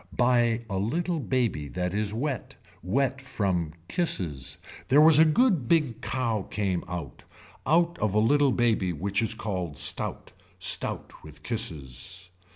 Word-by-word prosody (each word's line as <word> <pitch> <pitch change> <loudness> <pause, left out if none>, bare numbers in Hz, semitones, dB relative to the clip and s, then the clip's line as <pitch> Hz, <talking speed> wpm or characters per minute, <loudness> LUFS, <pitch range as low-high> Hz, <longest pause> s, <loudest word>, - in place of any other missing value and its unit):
By 120 -2 +2
a 95 -3 -2
little 165 - -1
baby 120 - -1
that 90 +4 -3
is 105 0 -1
wet. 130 +2 -3 0.3
Wet 130 - 0
from 90 - -1
kisses. 85 - -1 0.3
There 140 +3 +5
was 155 0 +7
a 160 - +8
good 170 - +2
big 150 -8 +1
cow 115 -5 -1
came 95 -4 -1
out. 85 -8 -7 0.4
Out 170 +2 +2
of 105 -1 0
a - - +5
little 140 +5 +3
baby 110 -7 +1
which 100 +6 -1
is 115 0 -1
called 90 -9 -4
stout. - - -1 0.3
Stout - - -1
with 75 -1 -14
kisses. 90 - -4
110 Hz, 145 wpm, -27 LUFS, 90-135 Hz, 0.4 s, a